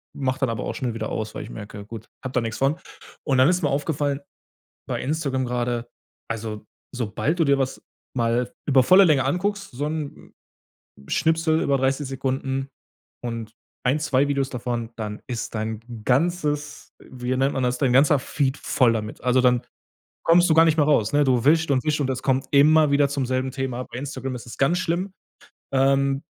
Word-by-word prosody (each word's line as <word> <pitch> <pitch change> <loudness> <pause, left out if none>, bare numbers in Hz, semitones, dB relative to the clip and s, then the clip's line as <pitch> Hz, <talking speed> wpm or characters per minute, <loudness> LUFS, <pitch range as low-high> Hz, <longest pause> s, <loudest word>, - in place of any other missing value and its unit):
mach 130 -1 -1
dann 130 -3 0
aber 115 -2 -3
auch - - -4
schnell 125 -6 -2
wieder 110 -1 -4
aus, 110 0 -4
weil - - -5
ich - - -10
merke, 105 -1 -8
gut, 110 0 -9 0.2
habe 130 -1 -5
da 125 - +2
nix 115 -1 -4
von. 140 +5 +2 0.5
Und 135 -3 +2
dann 130 +5 +6
ist 180 -1 +1
mir 145 - +2
aufgefallen, 145 0 -1 0.7
bei - - -2
Instagram 135 -2 -1
grade, 120 -1 -2 0.4
also, 110 -2 -5 0.3
sobald 125 - -1
du - - +5
dir 140 0 +3
was 130 -1 -2 0.3
mal 120 +1 0
über 130 -2 +5
volle 185 +5 +7
Länge 140 -5 +3
anguckst, 200 +7 -1
so 140 +4 -3
'n 150 -2 -5 0.8
Schnipsel 160 0 +2
über 140 -1 +2
30 135 +2 0
Sekunden 135 0 -2 0.6
und 115 -2 -5 0.3
1, 135 +5 +2
2 145 -2 +2
Videos 140 -1 0
davon, 120 -2 -3
dann 105 -1 -5
ist 120 -2 -4
dein 110 0 -3 0.2
ganzes 150 +1 0
wie 125 0 -4
nennt 135 +2 +2
man 130 - -1
das, 125 0 0
dein 130 -3 +2
ganzer 140 +2 +5
Feed 135 +1 -1
voll 125 -3 +2
damit. 105 -1 -5
Also, 125 +1 +3
dann 125 -1 +3 0.6
kommst 175 +1 +5
du - - +5
gar 165 +1 +6
nicht 160 0 +2
mehr 145 - +4
raus, 115 -8 +2
ne? 145 0 +4
Du 125 -3 +2
wischt 160 0 +4
und 130 -2 +2
wischt 150 -1 +1
und 135 - 0
es 130 0 -2
kommt 135 0 +1
immer 150 +1 +5
wieder 140 0 +3
zum 140 -2 -1
selben 130 +1 -1
Thema. 130 -2 -3
Bei - - -9
Instagram 135 -2 -5
ist 120 - -8
es - - -9
ganz 160 +6 +2
schlimm, 185 +2 -2 0.6
ähm. 135 +1 +2
135 Hz, 195 wpm, -24 LUFS, 125-145 Hz, 0.8 s, volle